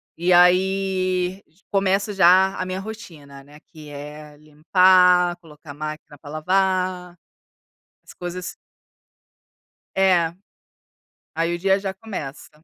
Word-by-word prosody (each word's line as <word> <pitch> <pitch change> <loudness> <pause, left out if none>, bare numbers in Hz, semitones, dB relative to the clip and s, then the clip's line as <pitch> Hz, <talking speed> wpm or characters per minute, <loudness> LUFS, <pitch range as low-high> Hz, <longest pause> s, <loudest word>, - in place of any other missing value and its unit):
E 175 +2 -1
aí, 185 +1 +2
j 165 +5 -33
começo 195 +1 0
já 190 +1 +4
a 185 - -3
minha 185 0 -4
rotina, 165 -10 -11
né, 145 +2 -17
que 155 -3 -15
é 150 +1 -10
limpar, 180 +3 +3
colocar 150 -3 -14
máquina 155 0 -8
para 145 - -13
lavar, 180 +2 -1 0.9
as - - -14
coisas 180 +1 -7 1.4
É, 180 -4 +2 1.0
aí 165 +1 -1
o - - -4
dia 195 +2 +2
já 195 -1 -5
começa. 185 -10 -8
180 Hz, 115 wpm, -22 LUFS, 155-190 Hz, 1.4 s, já